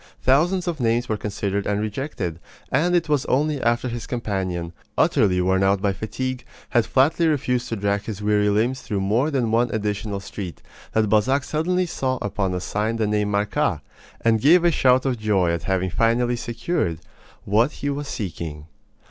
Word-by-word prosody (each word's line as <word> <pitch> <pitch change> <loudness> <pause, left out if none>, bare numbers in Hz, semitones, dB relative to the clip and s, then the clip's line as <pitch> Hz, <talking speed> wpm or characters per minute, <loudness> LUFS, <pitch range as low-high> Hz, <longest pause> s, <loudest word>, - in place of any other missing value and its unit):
Thousands 175 +8 +3
of 170 -4 -2
names 120 0 +1
were 110 - 0
considered 100 -1 -3
and 105 0 0
rejected, 105 - -3 0.3
and 170 +6 +2
it 170 -2 +1
was 145 -3 +1
only 145 +1 +1
after 120 +2 +1
his 120 -2 -5
companion, 95 -8 -3 0.2
utterly 90 -3 +3
worn 95 +1 +2
out 95 0 +3
by 100 0 +1
fatigue, 125 +5 -4 0.3
had 120 -4 +2
flatly 145 +7 +3
refused 125 -5 0
to 115 - -2
drag 100 0 -1
his 105 -3 -5
weary 105 0 +2
limbs 115 +5 +1
through 100 -2 -3
more 115 +9 +1
than 125 -6 0
one 120 +2 +2
additional 105 -1 -2
street, 95 -2 -7 0.3
that 110 -1 +2
Balzac 125 +7 +2
suddenly 180 +5 0
saw 130 -6 -2
upon 100 -2 -2
a - - -1
sign 105 +5 -2
the 110 -1 0
name 105 0 0
"Marcas," 100 -1 0 0.4
and 115 -1 +2
gave 170 +5 +6
a 170 - +5
shout 130 -3 +3
of 125 -4 0
joy 100 -5 +2
at 85 -1 -3
having 95 -1 0
finally 120 +4 +2
secured 120 - -2 0.5
what 115 +7 +3
he 145 - -3
was 145 +1 -4
seeking. 80 - -5
110 Hz, 180 wpm, -23 LUFS, 100-130 Hz, 0.5 s, gave